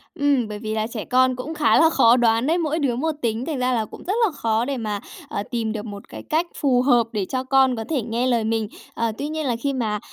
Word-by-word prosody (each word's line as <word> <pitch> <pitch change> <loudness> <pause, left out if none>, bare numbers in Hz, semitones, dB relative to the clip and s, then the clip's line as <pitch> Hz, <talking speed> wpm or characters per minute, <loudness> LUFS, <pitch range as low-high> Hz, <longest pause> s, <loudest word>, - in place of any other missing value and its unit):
Ừm, 280 -7 +2
bởi 210 -1 -6
vì 215 0 -4
là 215 0 -1
trẻ 230 -2 -6
con 255 0 +3
cũng 265 +6 -5
khá 305 -1 +3
là 325 - +6
khó 250 -6 +5
đoán 230 +2 +2
đấy, 330 - +2
mỗi 320 -1 -1
đứa 265 -5 0
một 315 +6 0
tính, 230 +1 -1
thành 305 -5 -3
ra 255 0 +1
là 220 -2 0
cũng - - -12
rất 385 - +1
là 390 - 0
khó 225 -4 0
để 275 0 -2
mà, 210 -3 -3 0.3
ờ, 200 - -3
tìm 230 -3 -1
được 215 0 -5
một 200 -2 -9
cái - - -9
cách 330 +3 0
phù 255 -4 +2
hợp 245 -3 +3
để 210 -4 -1
cho 255 +5 -3
con 265 -1 +3
có 225 - -4
thể 295 -5 0
nghe 235 +3 -1
lời 235 -3 +2
mình. 220 -1 0 0.3
Ờ, 230 -1 -1
tuy 285 - -3
nhiên 310 0 -3
là 245 -3 0
khi 275 +4 -2
mà, 215 -5 -1
245 Hz, 280 wpm, -22 LUFS, 225-280 Hz, 0.3 s, là